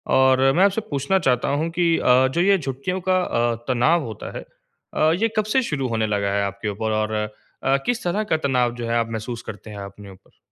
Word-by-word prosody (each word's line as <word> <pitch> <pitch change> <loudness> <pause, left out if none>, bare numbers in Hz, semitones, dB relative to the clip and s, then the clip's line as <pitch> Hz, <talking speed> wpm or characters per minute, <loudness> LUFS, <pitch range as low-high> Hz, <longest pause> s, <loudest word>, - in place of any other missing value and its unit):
और 130 0 +4
मैं 185 - +4
आपसे 200 +3 +1
पूछना 145 +7 +1
चाहता 125 -6 +1
हूँ 155 +4 0
कि 170 -1 +3
अ, 130 +1 +4
जो 170 +6 -1
ये 195 +1 +4
छुट्टियों 140 +7 -3
का 185 0 +4
अ, 120 -4 0
तनाव 150 +7 +3
होता 110 -3 -7
है - - -6 0.5
अ, 155 +1 +3
ये 225 - +4
कब 215 - +2
से 265 - +5
शुरू 135 - -2
होने 110 -1 0
लगा 100 -1 0
है 100 0 +1
आपके 100 +2 -4
ऊपर 110 +2 -3
और 110 0 -2
अ, 105 +5 -2
किस 245 -1 -1
तरह 200 +5 0
का - - +4
तनाव 125 -2 +1
जो 120 -1 -5
है 115 - 0
आप 115 -1 0
महसूस 115 +1 -5
करते 105 +1 -8
हैं 105 - -8
अपने 100 +1 -12
ऊपर? 95 0 -20
125 Hz, 230 wpm, -22 LUFS, 110-165 Hz, 0.5 s, से